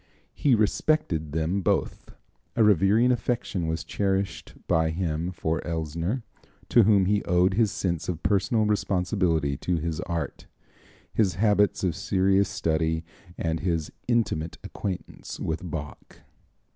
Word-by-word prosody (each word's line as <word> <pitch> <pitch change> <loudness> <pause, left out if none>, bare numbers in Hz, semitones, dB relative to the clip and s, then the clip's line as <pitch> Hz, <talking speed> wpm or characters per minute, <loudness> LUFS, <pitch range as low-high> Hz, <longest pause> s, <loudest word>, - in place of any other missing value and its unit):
He 135 -4 +3
respected 105 - +1
them 80 +5 0
both. - - -1 0.5
A 115 - +4
revering 105 +4 +4
affection 115 -7 -1
was 80 0 -2
cherished 95 -6 -2
by 80 0 +2
him 85 0 -2
for 80 -2 -2
Elsner, 85 - -2 0.5
to 120 - +6
whom 100 -3 +4
he 100 +2 +1
owed 90 +2 +3
his 110 0 +2
sense 85 -3 -2
of 85 -2 -4
personal 105 +3 +2
responsibility 90 -7 +1
to 90 +3 -1
his 80 -1 -3
art, 85 -4 -4 0.7
his 95 -6 +2
habits 105 0 +2
of 90 -3 +1
serious 95 +1 +2
study 80 0 0 0.3
and 80 -1 -1
his 85 -1 -1 0.2
intimate 110 -9 0
acquaintance 95 -3 -6
with 80 0 -2
Bach. 75 -3 -8
90 Hz, 130 wpm, -26 LUFS, 80-105 Hz, 0.7 s, to